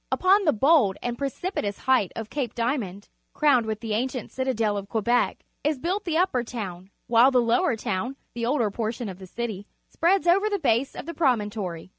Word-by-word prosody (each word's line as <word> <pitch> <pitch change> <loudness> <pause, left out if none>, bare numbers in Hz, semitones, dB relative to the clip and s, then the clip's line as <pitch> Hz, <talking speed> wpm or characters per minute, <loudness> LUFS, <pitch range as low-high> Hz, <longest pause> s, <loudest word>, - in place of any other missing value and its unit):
Upon 390 +2 +4
the 305 - +5
bold 255 - +3
and 240 -1 -2
precipitous 275 - -3
height 260 -8 +2
of 225 -1 -6
Cape 260 -6 -3
Diamond, 230 -6 -2 0.3
crowned 265 -7 +3
with 215 0 -3
the 225 -2 -3
ancient 255 +3 -2
citadel 230 -5 0
of 200 -1 -5
Quebec, 235 +2 0 0.2
is 300 0 +1
built 365 +9 -2
the 325 -3 0
Upper 340 -9 +2
Town, 195 -6 -6 0.2
while 240 +2 +5
the 255 -2 +3
Lower 235 +5 +2
Town 225 +3 -3
— - - -46
the 235 -1 -2
older 240 -6 +1
portion 225 +1 -3
of 185 -1 -9
the 190 - -10
city 215 -1 -5
— - - -47
spreads 355 +2 +2
over 390 +5 +4
the 410 - 0
base 270 - +1
of - - -7
the 335 - -5
promontory. 210 - -1
240 Hz, 200 wpm, -25 LUFS, 215-290 Hz, 0.3 s, the